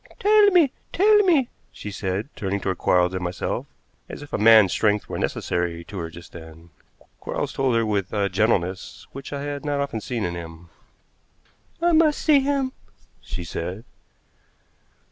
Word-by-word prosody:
"Tell 420 +1 +5
me! 345 -8 +4 0.2
Tell 420 +4 +5
me!" 340 - +4 0.2
she 105 - -8
said, 100 +4 -3
turning 100 0 -2
toward 95 -2 -3
Quarles 90 0 +2
and 95 -1 -3
myself, 90 0 -3 0.4
as - - -8
if 145 - -14
a - - +1
man's 110 -3 +7
strength 105 +1 +1
were - - -5
necessary 85 -1 -2
to 95 +2 -8
her 85 -1 -4
just 85 0 -13
then. 80 0 -13 0.5
Quarles - - -4
told 135 -3 +1
her 115 -1 +2
with 100 -3 -1
a 100 -2 0
gentleness 95 -2 -1
which 135 0 -9
I 140 -1 -4
had 145 -1 -5
not 145 -1 -1
often 140 -6 -3
seen 115 0 -3
in 85 - -2
him. 85 0 -9 1.1
"I 345 - +4
must 315 -2 +4
see 300 -3 +4
him," 275 -1 0 0.5
she 90 - -6
said. 90 +5 -5
105 Hz, 165 wpm, -23 LUFS, 90-145 Hz, 1.1 s, man's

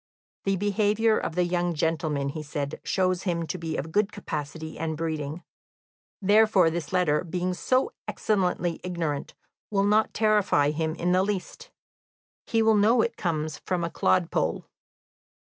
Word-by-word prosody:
"The 195 0 +2
behaviour 210 +3 +2
of 160 - -4
the 180 - +3
young 175 -1 0
gentleman," 155 -3 0
he 155 +2 -5
said, 145 -1 -4
"shows 185 -1 +1
him 170 -3 -1
to 175 - -4
be 160 -1 -3
of 160 +4 -4
good 210 +3 +2
capacity 155 -4 -6
and 160 -1 -2
breeding; 160 0 -3 0.8
therefore 205 -3 +4
this 165 -3 -4
letter, 180 -5 +2
being 180 +1 -2
so 255 - +1 0.2
excellently 180 -4 0
ignorant, 165 -5 -3 0.3
will 200 -2 +1
not 210 +1 +3
terrify 205 -9 +3
him 160 +1 -2
in 175 +1 0
the 185 +1 +4
least; 205 - -4 0.8
he 225 -1 +2
will 220 0 +5
know 225 +3 +4
it 235 - -2
comes 155 -4 -2
from 180 -2 -2
a 170 - -2
clodpole. 180 -2 +1
175 Hz, 150 wpm, -26 LUFS, 160-205 Hz, 0.8 s, will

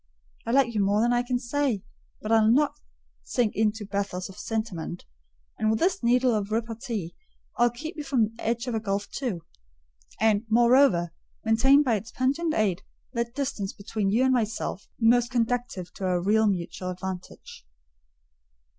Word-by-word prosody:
I - - 0
like 255 -2 +3
you 210 -2 +1
more 200 +2 +2
than 240 +2 +3
I 240 - +3
can 245 0 -1
say; 250 -4 -1 0.4
but 215 - -3
I'll 220 -1 +5
not 285 +5 +3 0.5
sink 230 - -1
into 215 0 0
a - - -9
bathos 200 -2 -3
of 190 - -11
sentiment: 205 -7 -4 0.5
and 215 - +2
with 220 - +2
this 360 +7 +1
needle 245 +1 +3
of 210 -2 -1
repartee 225 -5 -3 0.4
I'll 240 0 +4
keep 305 +9 -7
you 300 - -4
from 270 -5 +2
the 225 +2 -4
edge 235 +1 -1
of 245 - -3
the 220 - 0
gulf 200 -1 -3
too; 230 - -4 0.7
and, 215 -1 +3
moreover, 235 -7 +4 0.3
maintain 265 +6 +5
by 235 -6 +2
its 215 +3 -8
pungent 285 +6 0
aid 195 -5 +1 0.3
that 235 -1 -2
distance 260 -9 -3
between 205 0 -2
you 230 +6 +3
and 260 0 +3
myself 220 -4 -2
most 240 +1 +4
conducive 235 -7 -2
to 195 - -5
our 180 -1 +1
real 215 +4 +3
mutual 185 -1 -2
advantage." 180 - -7
225 Hz, 170 wpm, -26 LUFS, 200-245 Hz, 0.7 s, I'll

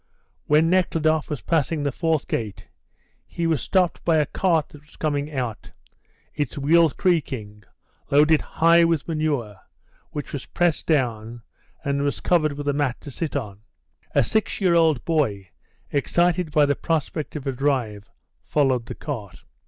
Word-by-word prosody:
When 155 +2 +4
Nekhludoff 160 -3 +1
was 150 -4 -4
passing 160 -1 0
the 140 - 0
fourth 160 0 -1
gate, 100 -4 -4 0.6
he 170 - -3
was 160 -5 +1
stopped 185 -3 +1
by 165 -2 +3
a 150 - +3
cart 165 -2 0
that 150 -1 -15
was 150 - -19
coming 145 -1 -2
out, 125 -6 -4 0.6
its 145 -3 -3
wheels 160 +2 +4
creaking, 120 - -1 0.4
loaded 150 +2 +4
high 170 +1 +4
with 165 -3 +1
manure, 150 - -2 0.5
which 145 - -6
was 140 - -5
pressed 175 -3 0
down, 120 -6 -1 0.4
and 140 0 0
was 140 -1 -1
covered 155 -4 +2
with 145 0 -6
a 145 - +2
mat 140 -3 -1
to 145 - -9
sit 155 +3 -4
on. 105 -8 -4 0.6
A - - +5
six 220 - -1
year 185 -4 +3
old 160 -7 +3
boy, 105 - 0 0.4
excited 175 +4 +1
by 150 -1 +4
the 145 0 +1
prospect 160 -1 -2
of 150 -2 -5
a 135 - 0
drive, 125 -6 -1 0.3
followed 130 -5 +1
the - - -6
cart. 115 - -7
150 Hz, 160 wpm, -23 LUFS, 130-165 Hz, 0.6 s, A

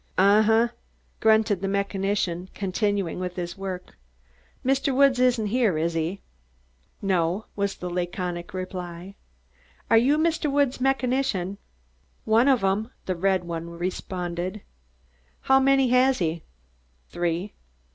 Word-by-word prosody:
"Un 200 +3 +5
hu," 225 +2 +4 0.5
grunted 220 -3 +3
the 195 - -1
mechanician, 195 -2 -1
continuing 200 -2 -1
with 180 -1 -4
his 175 -1 -4
work. 190 - -7 0.7
"Mr. 270 0 +1
Woods 275 -2 +4
isn't 250 -3 +3
here, 215 -5 +1
is 165 +2 0
he?" 165 +4 -2 0.8
"No," 185 +1 0
was 200 -1 -1
the 180 - -6
laconic 175 0 -3
reply. 185 0 -6 0.8
"Are 225 - +7
you 275 +6 +3
Mr. 315 -2 +1
Woods' 280 -3 +1
mechanician?" 250 -8 0 0.7
"One 225 +4 +4
of 260 -6 +3
'em," 200 +4 +1 0.2
the 185 - -1
red 190 +1 +1
one 170 -1 -5
responded. 180 +2 -4 0.8
"How 265 0 +4
many 270 -1 +3
has 255 +1 +4
he?" 165 -1 -1 0.7
"Three." 175 +3 -2
195 Hz, 125 wpm, -25 LUFS, 180-240 Hz, 0.8 s, Are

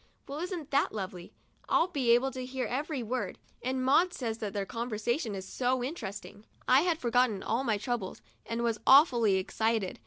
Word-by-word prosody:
"Well, 280 +2 -5
isn't 345 -4 -5
that 280 +1 +2
lovely? 185 -3 -6 0.4
I'll - - +4
be 275 -8 -1
able 245 +3 +4
to 255 0 -5
hear 255 0 -3
every 275 +1 -2
word, 250 +3 -3 0.2
and 255 +1 -1
Maud 340 +7 +4
says 230 -3 -3
that 210 -2 -3
their 200 -1 -2
conversation 230 - -2
is 190 0 -6
so 250 +2 0
interesting." 210 - -6 0.2
I 260 +2 +6
had 340 -1 +1
forgotten 240 -6 +1
all 235 +4 0
my 225 -5 +1
troubles, 225 -3 -3 0.2
and 230 +1 -3
was 230 -2 0
awfully 245 - +6
excited. 220 +1 -1
245 Hz, 180 wpm, -30 LUFS, 215-270 Hz, 0.4 s, I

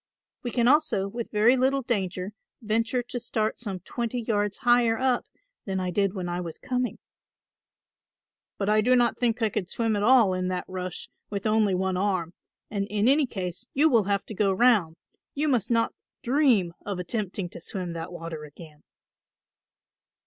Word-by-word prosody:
We 245 - -3
can 240 0 +1
also 290 -9 +3
with 230 +3 -5
very 220 +4 +4
little 265 +1 +1
danger 190 -5 -2 0.3
venture 230 +3 0
to 245 +1 -5
start 220 -2 -2
some 195 -6 -5
twenty 240 0 -3
yards 205 -3 -1
higher 240 -2 +3
up 255 -1 +1 0.4
than 190 -1 -2
I 185 -1 -2
did 195 +1 +1
when 185 -2 -3
I 175 +1 -2
was 165 -2 -6
coming." 250 -2 -2 1.6
"But 200 - -2
I 215 +1 +4
do 250 +4 +4
not 240 -2 +2
think 235 -1 +1
I 220 - +4
could 190 -3 -3
swim 225 0 0
at 205 - -1
all 230 -3 +5
in 185 0 -1
that 185 -1 -2
rush 185 -1 -5 0.2
with 200 0 -4
only 215 -3 +3
one 190 0 0
arm, 185 -3 -1 0.4
and 200 -1 -2
in 210 +2 +1
any 280 +1 +4
case 185 +1 -5
you 305 +4 +5
will 225 -5 +4
have 200 0 0
to - - -7
go 200 -1 +2
round; 190 -6 +3 0.4
you 300 +2 0
must 240 -7 +1
not 230 -1 +2 0.3
dream 240 - +3
of 200 -2 -4
attempting 190 0 -3
to - - -10
swim 180 -3 -5
that 165 +1 -6
water 165 -3 -7
again." 150 0 -13
210 Hz, 180 wpm, -26 LUFS, 185-240 Hz, 1.6 s, all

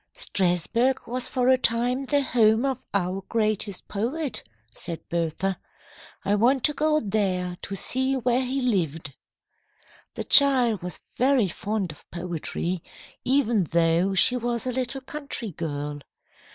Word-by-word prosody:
"Strasburg 230 - +1
was 250 +1 -3
for 250 -1 0
a 260 0 +5
time 245 +3 +1
the 285 +1 +2
home 225 -1 +3
of 260 -1 -2
our 190 0 -1
greatest 215 -3 -1
poet," 255 +8 -3 0.3
said 170 -2 -7
Bertha. 170 +3 -1 0.7
"I 200 - +2
want 245 +5 +3
to 300 - +4
go 305 +1 +2
there 190 -5 -1
to 195 - -5
see 260 +6 0
where 250 0 +1
he 265 +2 -2
lived." 165 - -1 1.0
The - - -3
child 255 - +5
was 180 0 -5 0.2
very 255 -4 +3
fond 205 -1 -3
of 150 - -16
poetry, 175 0 -4 0.4
even 240 -7 +2
though 170 +4 +2
she 245 +6 +5
was 240 -1 -2
a 255 - -1
little 260 +1 -3
country 265 -5 -6
girl. 145 -3 -4
225 Hz, 140 wpm, -25 LUFS, 180-255 Hz, 1.0 s, a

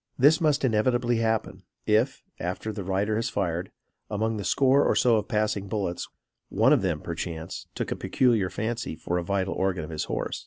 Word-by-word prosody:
This 145 +5 +5
must 150 -4 +2
inevitably 120 +1 +2
happen 110 -4 -1 0.2
if, 110 +5 +2 0.2
after 95 +5 -3
the 100 -2 -5
rider 100 +3 0
has 115 +1 -1
fired, 90 -5 -2 0.4
among 110 +1 -1
the 100 - -4
score 135 +8 +4
or - - +2
so 120 -3 +4
of 105 - -2
passing 105 -2 0
bullets, 95 -4 -3 0.4
one - - +4
of - - +3
them, - - -1
perchance, 80 0 -5
took - - -3
a - - 0
peculiar 115 -8 +2
fancy 110 -3 -3
for 90 +2 -2
a - - -3
vital 95 +1 -1
organ 95 -4 -1
of 75 - -7
his 75 - -2
horse. - - -3
105 Hz, 190 wpm, -26 LUFS, 95-115 Hz, 0.4 s, This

